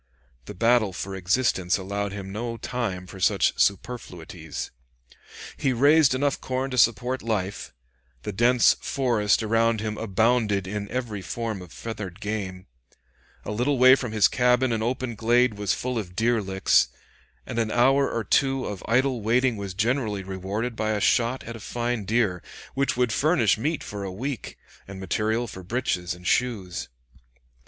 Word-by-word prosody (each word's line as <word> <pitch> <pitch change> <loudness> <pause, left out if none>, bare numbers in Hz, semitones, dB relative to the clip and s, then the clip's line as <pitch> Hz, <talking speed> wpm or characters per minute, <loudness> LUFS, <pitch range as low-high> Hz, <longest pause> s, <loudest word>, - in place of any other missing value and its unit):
The 105 - -8
battle 115 -1 +3
for 95 +3 -5
existence 95 -1 +1
allowed 100 +1 -3
him 95 -1 -7
no 115 +3 -4
time 115 -8 -3
for 95 +1 -11
such - - +3
superfluities. 115 +5 -3 0.9
He 135 - +1
raised 140 +2 +5
enough 140 +1 0
corn 130 +1 -2
to 125 - -3
support 120 +3 +2
life; 100 - -3 0.5
the - - -3
dense 120 +3 +5
forest 115 -6 +1
around 115 +1 +2
him 105 0 -4
abounded 110 -1 +1
in 100 +1 -4
every 115 -6 -3
form 110 -1 -4
of 90 -3 -12
feathered 95 - -7
game; 100 -4 -4 0.8
a - - -4
little 125 +6 0
way 130 +1 +8
from 125 -4 0
his 110 -2 +5
cabin 125 0 +2
an 115 -1 0
open 125 +1 -2
glade 120 +2 +3
was 105 -1 -1
full 125 -2 -2
of 90 -4 -7
deer 115 +2 +2
licks, 95 -1 +3 0.6
and 115 - -3
an 110 -1 0
hour 135 +4 +3
or 115 - -2
two 135 +5 +1
of 100 -3 -6
idle 125 +1 +2
waiting 120 +3 +2
was 100 -3 -6
generally 110 -2 0
rewarded 95 +5 -4
by 110 0 -1
a 105 - -1
shot 120 +4 +2
at 115 - -7
a - - -8
fine 120 -1 -3
deer, 105 -4 +1 0.3
which 135 -2 0
would 125 -3 +1
furnish 130 - +3
meat 150 +7 -2
for 100 -1 -6
a 95 - -4
week, 125 +4 -5 0.3
and 95 -1 -8
material 110 +5 -1
for 95 -4 -9
breeches 90 -4 -2
and 90 0 -15
shoes. 100 -6 -1
110 Hz, 165 wpm, -25 LUFS, 100-125 Hz, 0.9 s, way